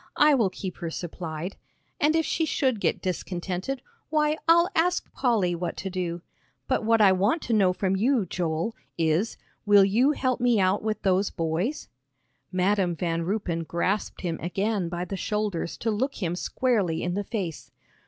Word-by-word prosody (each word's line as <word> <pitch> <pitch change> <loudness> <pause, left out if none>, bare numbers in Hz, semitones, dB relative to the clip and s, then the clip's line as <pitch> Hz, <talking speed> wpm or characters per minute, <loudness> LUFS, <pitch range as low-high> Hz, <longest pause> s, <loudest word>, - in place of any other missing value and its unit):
I 300 0 +6
will 230 -8 +3
keep 185 -1 -6
her 170 - -4
supplied. 170 +1 -5 0.4
And 300 +2 +3
if 325 -1 +2
she 330 - 0
should 260 -7 +1
get - - 0
discontented, 185 +6 -3 0.3
why 305 0 +1
I'll 340 +1 +6
ask 350 +2 +1
Polly 220 -9 +1
what 175 0 -3
to 190 - -4
do. 175 -2 -3 0.4
But - - +1
what 225 0 +3
I 200 -2 +7
want 205 - +1
to 235 - -1
know 195 -4 +4
from 190 +1 0
you, 230 +2 +2
Joel, 170 +5 -2 0.2
is, 165 +6 +1 0.3
will 205 -2 +6
you 240 +9 +3
help 255 -3 0
me 240 -3 +3
out 190 +1 +2
with 215 0 -2
those 190 +1 +2
boys?" 170 - -2 0.6
Madam 185 -1 +1
Van 165 0 -1
Ruypen 180 -4 -1
grasped 180 +5 -2
him 170 -3 -3
again 195 +1 -1
by 175 +1 -3
the 195 +2 -5
shoulders 210 -4 -2
to 225 - -1
look 260 +6 -1
him 175 -4 -2
squarely 200 -5 0
in 175 +1 -1
the 205 +2 -1
face. 190 -7 -4
195 Hz, 175 wpm, -26 LUFS, 175-230 Hz, 0.6 s, I